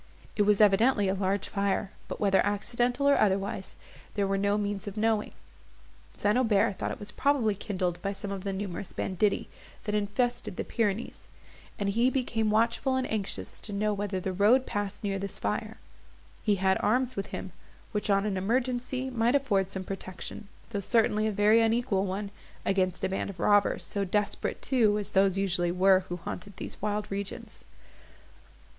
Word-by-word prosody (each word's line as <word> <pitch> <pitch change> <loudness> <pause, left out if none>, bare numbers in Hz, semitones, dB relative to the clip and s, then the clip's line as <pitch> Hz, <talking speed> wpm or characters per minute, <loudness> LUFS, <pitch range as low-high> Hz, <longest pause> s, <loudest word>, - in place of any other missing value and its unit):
It - - +1
was 210 - +4
evidently 210 +1 +4
a 190 - +2
large 195 0 -1
fire, 200 0 -1 0.2
but - - -6
whether 195 -2 +3
accidental, 240 +6 0
or 280 - +5
otherwise, 195 -1 0 0.4
there 200 -1 +1
were 195 0 0
no 200 +1 +1
means 205 -1 -2
of 205 +1 -6
knowing. 220 -1 +1 0.9
St. 205 +1 +2
Aubert 220 -4 +2
thought - - -1
it - - -4
was 205 0 -7
probably 265 -6 +2
kindled 185 -3 -3
by 195 - -1
some 200 0 -5
of 195 -2 -4
the 200 - -2
numerous 190 -1 -5
banditti, 195 +2 0 0.4
that 210 - -3
infested 210 +2 -1
the - - -1
Pyrenees, 220 -1 -2 0.5
and 200 -1 -1
he 230 +5 +3
became 240 -5 0
watchful 230 +5 +2
and 260 0 0
anxious 210 -3 -3
to 210 - -6
know 210 +1 +1
whether 200 -2 -2
the 185 +1 -3
road 220 +8 +4
passed 205 0 -3
near 195 -1 -1
this 200 0 -4
fire. - - -3 0.6
He 210 -2 +2
had 190 0 +2
arms 250 +3 +1
with 195 - -3
him, 190 - -6 0.4
which, 210 0 -2
on 200 0 +3
an 200 -3 -1
emergency, 255 +5 -1
might 240 +2 +2
afford 205 -9 +2
some 190 -1 -4
protection, 190 +2 -7 0.2
though 205 - -1
certainly 215 +1 +2
a - - 0
very 210 +2 +4
unequal 225 -4 +1
one, 200 +2 -3 0.3
against 185 -2 +1
a 190 - +1
band 195 - -2
of 190 -3 -9
robbers, 205 +2 +3
so 200 - -2
desperate 205 +2 -1
too 220 -6 +3
as 205 -1 -2
those 195 -1 +3
usually 180 -3 +1
were 185 +1 +5
who 175 - -3
haunted 180 +3 -7
these - - -7
wild 210 0 -1
regions. 200 0 -5
205 Hz, 175 wpm, -29 LUFS, 195-220 Hz, 0.9 s, or